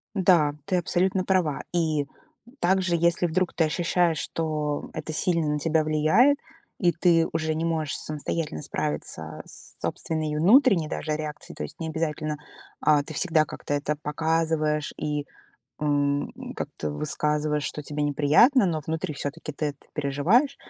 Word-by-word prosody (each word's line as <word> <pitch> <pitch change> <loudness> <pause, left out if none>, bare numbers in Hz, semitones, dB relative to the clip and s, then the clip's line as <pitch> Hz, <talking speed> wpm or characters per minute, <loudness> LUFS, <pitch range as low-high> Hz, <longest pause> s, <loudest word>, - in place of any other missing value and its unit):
Да, 175 -6 +4
ты 185 0 +1
абсолютно 185 +2 +1
права. 180 -7 +1
И, 155 -4 +1 0.6
также, 185 -1 +2
если 170 +1 +2
вдруг 175 +2 0
ты 165 - +2
ощущаешь, 170 0 +1
что 150 -2 -2
это 155 0 -4
сильно 170 -1 +1
на 150 0 0
тебя 160 0 +2
влияет 155 - +4 0.4
и 175 - +4
ты 170 0 +3
уже 160 -1 0
не 160 - -2
можешь 160 -3 -1
самостоятельно 150 - -3
справиться 80 +1 -4
с - - -9
собственной 155 -2 -2
внутренней, 195 - +5
даже, 155 - -3
реакцией, 150 -1 -6
то - - -5
есть 155 - -7
не 165 - -4
обязательно, 155 -1 -2 0.4
а, 150 -1 +4
ты 155 - -7
всегда 160 -1 +3
как-то 145 - -5
это 145 +1 0
показываешь 155 0 0
и, 150 -1 -2 0.6
м, 145 -1 +1 0.2
как-то 75 - -4
высказываешь, 150 - 0
что 150 - -4
тебе 150 +1 -2
неприятно, 150 - +5
но 160 -3 -1
внутри 160 -1 -2
всё-таки 145 +3 -4
ты 145 - -4
это 140 - -18
переживаешь- 160 - +2
155 Hz, 150 wpm, -26 LUFS, 150-170 Hz, 0.6 s, внутренней